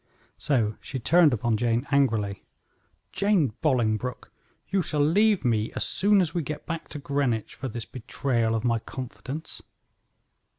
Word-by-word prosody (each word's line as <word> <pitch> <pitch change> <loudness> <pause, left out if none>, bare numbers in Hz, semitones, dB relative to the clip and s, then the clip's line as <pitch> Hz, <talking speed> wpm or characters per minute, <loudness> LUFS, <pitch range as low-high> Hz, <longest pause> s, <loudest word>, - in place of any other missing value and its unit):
So 115 -7 +1
she 135 - -5
turned 165 +5 +5
upon 115 -1 0
Jane 120 +3 0
angrily: 110 -8 +1 0.7
"Jane 190 - +2
Bolingbroke, 125 -4 0 0.4
you 195 0 +1
shall 150 -4 +1
leave 205 +1 +3
me 110 -2 +1
as - - -1
soon 200 0 +3
as 175 - -1
we 175 - 0
get 150 0 -6
back 165 0 -5
to - - -7
Greenwich 140 -6 -1
for 135 - -5
this 115 -2 -5
betrayal 115 -2 -1
of 110 - -2
my 115 -1 +2
confidence." 130 +5 -7
130 Hz, 145 wpm, -26 LUFS, 115-155 Hz, 0.7 s, turned